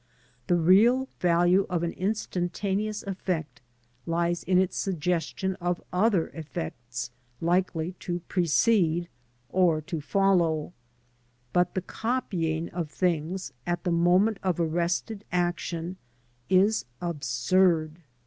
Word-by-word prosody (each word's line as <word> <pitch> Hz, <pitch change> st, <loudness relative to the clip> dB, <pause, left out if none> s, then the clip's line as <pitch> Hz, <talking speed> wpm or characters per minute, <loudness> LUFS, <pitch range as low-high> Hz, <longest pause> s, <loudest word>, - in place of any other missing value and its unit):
The 175 Hz, -, +3 dB
real 215 Hz, +10 st, +5 dB
value 175 Hz, +2 st, +3 dB
of 175 Hz, -2 st, -1 dB
an 170 Hz, -, 0 dB
instantaneous 200 Hz, +1 st, -2 dB
effect 180 Hz, -7 st, -3 dB, 0.5 s
lies 170 Hz, 0 st, 0 dB
in 185 Hz, +1 st, +2 dB
its 185 Hz, -1 st, +2 dB
suggestion 180 Hz, +1 st, -1 dB
of 175 Hz, 0 st, 0 dB
other 190 Hz, -2 st, +2 dB
effects 120 Hz, -, -6 dB, 0.3 s
likely 175 Hz, -1 st, 0 dB
to 175 Hz, -1 st, -3 dB
precede 175 Hz, -1 st, +2 dB, 0.4 s
or 175 Hz, -2 st, +3 dB
to 160 Hz, 0 st, -5 dB
follow, 175 Hz, -2 st, +2 dB, 0.8 s
but 180 Hz, 0 st, +2 dB
the 185 Hz, -, -1 dB
copying 175 Hz, -10 st, -2 dB
of 170 Hz, -3 st, -4 dB
things 175 Hz, +2 st, -1 dB
at 175 Hz, -1 st, -1 dB
the 180 Hz, -, 0 dB
moment 180 Hz, +5 st, +3 dB
of 185 Hz, -3 st, 0 dB
arrested 175 Hz, +5 st, -1 dB
action 175 Hz, 0 st, -2 dB, 0.5 s
is 195 Hz, +4 st, +3 dB
absurd. 160 Hz, +2 st, +1 dB
175 Hz, 110 wpm, -27 LUFS, 165-190 Hz, 0.8 s, real